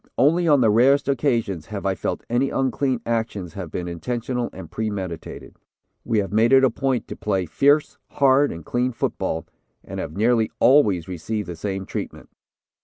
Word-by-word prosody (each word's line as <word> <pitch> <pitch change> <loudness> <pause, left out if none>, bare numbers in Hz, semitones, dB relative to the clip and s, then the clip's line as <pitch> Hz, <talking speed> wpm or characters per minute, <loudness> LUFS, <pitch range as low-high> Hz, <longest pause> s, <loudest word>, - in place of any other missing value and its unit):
Only 165 +7 +3
on 145 -4 +5
the 110 -3 +4
rarest 135 +6 +4
occasions 120 - 0
have 100 -1 -6
I 95 - +2
felt 90 - -4
any 125 +3 +1
unclean 130 -1 0
actions 110 -7 -2
have 95 -4 -6
been 90 +3 -4
intentional 120 +7 -3
and 85 -3 -10
premeditated. 100 -7 -5 0.5
We 115 -2 0
have 100 -1 -1
made 115 +3 +3
it 135 0 +6
a 130 - +4
point 130 0 -1
to - - -5
play 95 -3 -1
fierce, 145 - +2
hard 140 0 +3
and 80 -1 -8
clean 125 +1 -1
football, 80 -7 -2 0.4
and - - -7
have 80 - -6
nearly 115 +1 +2
always 105 - +4
received 100 +4 -4
the 85 - -5
same 95 +2 -4
treatment. - - -6
115 Hz, 175 wpm, -23 LUFS, 95-130 Hz, 0.5 s, it